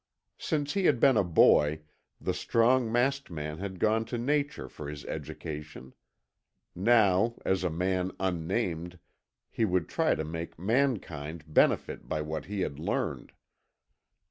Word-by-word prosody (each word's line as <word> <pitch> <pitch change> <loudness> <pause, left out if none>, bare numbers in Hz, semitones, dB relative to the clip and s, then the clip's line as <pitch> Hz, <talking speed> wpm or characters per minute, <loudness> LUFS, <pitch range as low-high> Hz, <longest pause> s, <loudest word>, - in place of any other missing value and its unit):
Since 145 -2 -1
he 195 -2 0
had 135 -8 +4
been 135 - +5
a 105 - +4
boy, 80 -3 +4 0.4
the - - -1
strong 115 0 +2
masked 135 +4 +1
man 75 -1 -5
had 95 -1 -5
gone 110 +4 +2
to 120 - -4
nature 145 +4 -1
for 75 -1 -8
his 75 -1 -8
education. 75 -4 -7 0.8
Now, 110 +1 +3
as 95 -1 +1
a 90 - +1
man 90 +2 -1
unnamed, 90 -1 -2 0.5
he - - -1
would 90 -5 +1
try - - +1
to 80 - -3
make 80 +2 -6
mankind 90 - -1
benefit 80 - +1
by 75 - -1
what 75 +1 -4
he 100 +2 -3
had 70 -5 -3
learned. - - -3
95 Hz, 145 wpm, -29 LUFS, 80-115 Hz, 0.8 s, been